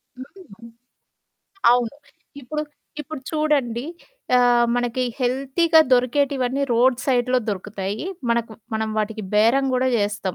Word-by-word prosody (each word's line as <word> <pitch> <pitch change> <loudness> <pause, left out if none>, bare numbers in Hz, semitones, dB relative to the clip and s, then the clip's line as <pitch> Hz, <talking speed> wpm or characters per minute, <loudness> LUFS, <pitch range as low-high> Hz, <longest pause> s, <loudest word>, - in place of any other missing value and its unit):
హ్మ్. 255 - -13 1.0
అవును. 245 0 0 0.5
ఇప్పుడు 300 +4 -4 0.4
ఇప్పుడు 300 -1 -7
చూడండి 285 -6 0 0.5
ఆహ్, 245 -1 +4
మనకి 245 +1 -1 0.2
హెల్తీగా 275 +6 +2
దొరికేటివన్నీ 260 +1 +1
రోడ్ 245 +2 +3
సైడ్‌లో 255 -1 +2
దొరుకుతాయి. 200 - -4 0.3
మనకు 235 -1 0 0.2
మనం 220 0 -1
వాటికి 215 0 -2
బేరం 230 +6 +4
గూడా 260 +1 +1
జేస్తాం. 205 -3 -2
245 Hz, 105 wpm, -22 LUFS, 225-270 Hz, 1.0 s, ఆహ్